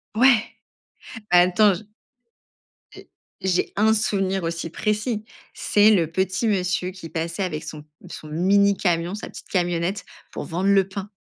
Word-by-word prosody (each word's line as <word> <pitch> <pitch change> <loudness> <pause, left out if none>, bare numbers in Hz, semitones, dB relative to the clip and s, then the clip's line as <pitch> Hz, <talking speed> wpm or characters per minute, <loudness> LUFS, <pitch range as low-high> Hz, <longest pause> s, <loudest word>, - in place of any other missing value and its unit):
Ouais, 245 -1 +5 0.9
bah 180 0 +6
attends 185 +3 +4
j 180 - -6 1.1
j'ai - - -14 0.3
j'ai 185 -1 0
1 220 +1 +4
souvenir 195 -3 0
aussi 165 0 -3
précis. 215 +3 -2 0.3
C'est 210 +1 +3
le 165 -6 +2
petit 190 +5 -1
monsieur 180 -2 0
qui 180 -3 -10
passait 165 +3 -3
avec 155 -4 -4
son 150 -1 -9 0.2
son 155 - -9
mini 200 +5 +3
camion, 175 +1 0
sa 210 - -8
petite - - -12
camionnette 175 +1 -1 0.3
pour - - -5
vendre 180 +4 -1
le 195 -1 +4
pain. 195 +1 -6
190 Hz, 150 wpm, -23 LUFS, 175-205 Hz, 1.1 s, bah